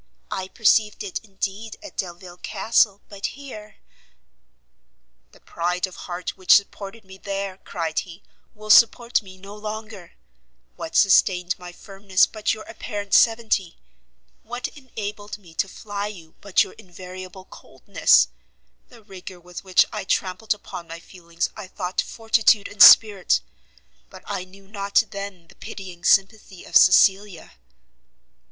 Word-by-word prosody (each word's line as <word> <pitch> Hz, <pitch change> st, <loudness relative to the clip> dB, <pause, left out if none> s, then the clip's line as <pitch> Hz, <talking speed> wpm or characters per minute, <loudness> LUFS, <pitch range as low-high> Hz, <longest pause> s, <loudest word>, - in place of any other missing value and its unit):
I 190 Hz, -1 st, -3 dB
perceived 215 Hz, 0 st, +2 dB
it 195 Hz, -, -4 dB
indeed, 200 Hz, +2 st, -6 dB
at 310 Hz, -, -11 dB
Delvile 175 Hz, -1 st, -6 dB
Castle, 220 Hz, +1 st, +1 dB
but 200 Hz, -1 st, -5 dB
here 215 Hz, -7 st, -11 dB, 0.8 s
" -, -, -47 dB
"The -, -, -20 dB
pride 180 Hz, +2 st, -2 dB
of 185 Hz, -, -12 dB
heart 175 Hz, 0 st, -6 dB
which 185 Hz, -2 st, +5 dB
supported 200 Hz, +1 st, -2 dB
me 190 Hz, 0 st, -14 dB
there," 195 Hz, -1 st, -4 dB
cried 165 Hz, -4 st, -3 dB
he, 175 Hz, +1 st, -10 dB, 0.3 s
"will 215 Hz, 0 st, -2 dB
support 235 Hz, +2 st, +5 dB
me 190 Hz, -2 st, -14 dB
no 200 Hz, +2 st, -11 dB
longer; 210 Hz, -3 st, -8 dB, 0.6 s
what 160 Hz, -, -8 dB
sustained 180 Hz, -2 st, +4 dB
my 180 Hz, 0 st, -9 dB
firmness, 195 Hz, +1 st, 0 dB
but 215 Hz, -1 st, -2 dB
your 215 Hz, 0 st, -5 dB
apparent 205 Hz, -1 st, -7 dB
severity? 225 Hz, -6 st, +2 dB, 0.6 s
What 245 Hz, +2 st, -5 dB
enabled 210 Hz, -7 st, -8 dB
me 175 Hz, -5 st, -18 dB
to 195 Hz, -, -1 dB
fly 205 Hz, +1 st, -5 dB
you, 170 Hz, -6 st, -11 dB
but 200 Hz, -2 st, +3 dB
your -, -, -11 dB
invariable 185 Hz, +1 st, -11 dB
coldness? -, -, +2 dB, 0.6 s
The 235 Hz, -3 st, -17 dB
rigour 190 Hz, -2 st, -11 dB
with 175 Hz, +1 st, -10 dB
which 185 Hz, -1 st, +4 dB
I -, -, -4 dB
trampled 195 Hz, +3 st, -1 dB
upon 175 Hz, -4 st, -10 dB
my 165 Hz, +1 st, -8 dB
feelings 170 Hz, -1 st, -5 dB
I 190 Hz, -, -8 dB
thought 185 Hz, 0 st, -3 dB
fortitude 225 Hz, -2 st, +2 dB
and 205 Hz, -, -6 dB
spirit, 205 Hz, -4 st, +8 dB, 0.7 s
but -, -, -14 dB
I 185 Hz, -, -4 dB
knew 195 Hz, +1 st, -18 dB
not 200 Hz, +1 st, +1 dB
then 200 Hz, -4 st, -8 dB
the -, -, -18 dB
pitying 180 Hz, -3 st, -10 dB
sympathy 195 Hz, -1 st, +1 dB
of -, -, -10 dB
Cecilia!" 190 Hz, -1 st, +4 dB
195 Hz, 140 wpm, -23 LUFS, 180-210 Hz, 0.8 s, spirit